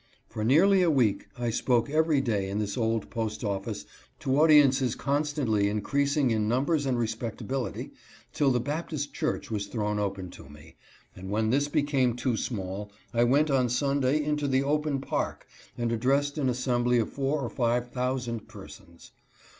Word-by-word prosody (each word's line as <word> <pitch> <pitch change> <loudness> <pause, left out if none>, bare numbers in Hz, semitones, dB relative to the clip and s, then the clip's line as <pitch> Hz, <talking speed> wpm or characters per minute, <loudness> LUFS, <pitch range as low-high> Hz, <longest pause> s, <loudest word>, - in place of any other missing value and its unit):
For 110 -2 -5
nearly 185 - +5
a 175 - +3
week 125 -9 +1
I 120 -1 -1
spoke 120 0 +1
every 155 -1 +2
day 105 -6 -1
in 100 - -3
this 105 -2 -2
old 115 -2 -1
post 110 -1 -3
office 100 -2 -3 0.4
to 135 +2 +1
audiences 140 -5 +5
constantly 140 -8 0
increasing 140 +6 +1
in 110 -1 +1
numbers 140 +5 +1
and 130 -2 +1
respectability, 115 +3 -3 0.4
till 145 - +2
the 125 -2 +2
Baptist 145 +2 -4
church 155 -4 -2
was 100 -2 -2
thrown 105 -1 -2
open 95 -3 -3
to 65 - -13
me; 75 +2 -15 0.4
and 95 +1 -8
when 110 +2 +1
this 145 +2 +2
became 140 -5 +1
too 125 -1 -1
small 100 -2 -4 0.2
I 120 0 +3
went 145 +5 +3
on 130 -2 +2
Sunday 140 +3 +1
into 150 -1 -1
the 135 0 +2
open 150 -1 0
Park - - -3 0.3
and 120 -1 -1
addressed 140 +6 +1
an 135 -3 +1
assembly 125 -1 +1
of 115 - 0
four 140 +2 0
or 120 - -3
five 120 +1 0
thousand 125 -3 -2
persons. 85 0 -13
125 Hz, 165 wpm, -28 LUFS, 110-140 Hz, 0.4 s, nearly